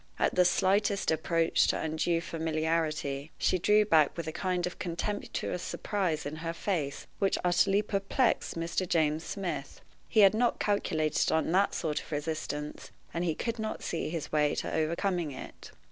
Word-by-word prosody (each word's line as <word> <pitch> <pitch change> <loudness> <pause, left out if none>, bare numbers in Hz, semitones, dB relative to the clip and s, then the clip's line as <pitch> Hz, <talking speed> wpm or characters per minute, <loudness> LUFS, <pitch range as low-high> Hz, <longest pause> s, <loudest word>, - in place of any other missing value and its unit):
At - - +1
the 180 - +4
slightest 200 +2 +2
approach 165 +1 +2
to - - +1
undue 160 +2 0
familiarity, 160 -3 -1
she 185 - +2
drew 210 +4 +4
back 160 -6 +4
with 170 - -3
a 160 - -3
kind 180 +1 -1
of 180 - -6
contemptuous 180 0 -3
surprise 185 -6 -2
in 150 +2 -4
her 165 +1 -3
face, 165 -6 -2
which 195 -1 +2
utterly 195 +3 +3
perplexed 205 +5 0
Mr. 170 +2 -2
James 155 -1 +2
Smith. 175 -8 -4 0.3
He 220 - +5
had 195 0 +7
not 240 +2 +1
calculated 160 -7 +1
on 160 0 +1
that 195 +3 +3
sort 155 -3 -1
of - - -14
resistance, 150 -1 -4 0.2
and 170 - -1
he 165 -3 0
could 230 +5 -3
not 220 0 -4
see 165 - -2
his 165 -2 -4
way 150 -1 +2
to - - -3
overcoming 170 +1 0
it. 130 - -10
170 Hz, 165 wpm, -30 LUFS, 155-195 Hz, 0.3 s, had